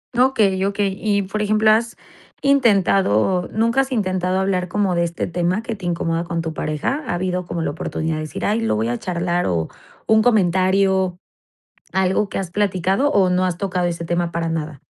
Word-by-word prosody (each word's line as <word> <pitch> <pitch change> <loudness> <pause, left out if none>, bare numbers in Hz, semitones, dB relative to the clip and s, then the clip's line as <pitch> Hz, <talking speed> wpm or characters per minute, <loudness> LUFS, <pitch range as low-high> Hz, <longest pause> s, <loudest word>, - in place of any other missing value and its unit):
Okey, 220 -7 +3
okey. 200 0 0
Y, 205 -2 +1
por 195 +3 -4
ejemplo, 215 +1 +3
¿has 230 +2 +1 0.5
intentado 195 - +3
nunca 230 +4 +2
has 270 0 -4
intentado 185 -5 0
hablar 190 -2 0
como 190 +1 0
de 170 0 +1
este 170 0 -3
tema 180 +4 -1
que 230 -1 -4
te 190 -4 -6
incomoda 165 -1 -1
con 170 -1 -3
tu 160 -1 -4
pareja? 155 - -2
¿Ha 175 - -1
habido 180 0 -2
como 170 -2 -3
la 145 - -1
oportunidad 160 +1 -3
de - - -3
decir?: 155 - -5
"Ay, 215 +2 +1
lo 225 - 0
voy 110 +2 -1
a 120 - -2
charlar, 175 0 -1
o, 85 -3 -1 0.4
un 220 0 +4
comentario, 190 -3 +2 0.8
algo 190 +2 +1
que - - -4
has 190 -3 -4
platicado, 195 +6 +1
o, 190 -2 +3
¿no 180 +1 +2
has 180 -2 -1
tocado 180 -2 -1
ese 170 -1 -4
tema 175 0 -1
para 170 -1 -2
nada? 155 -3 -4
185 Hz, 195 wpm, -20 LUFS, 170-205 Hz, 0.8 s, un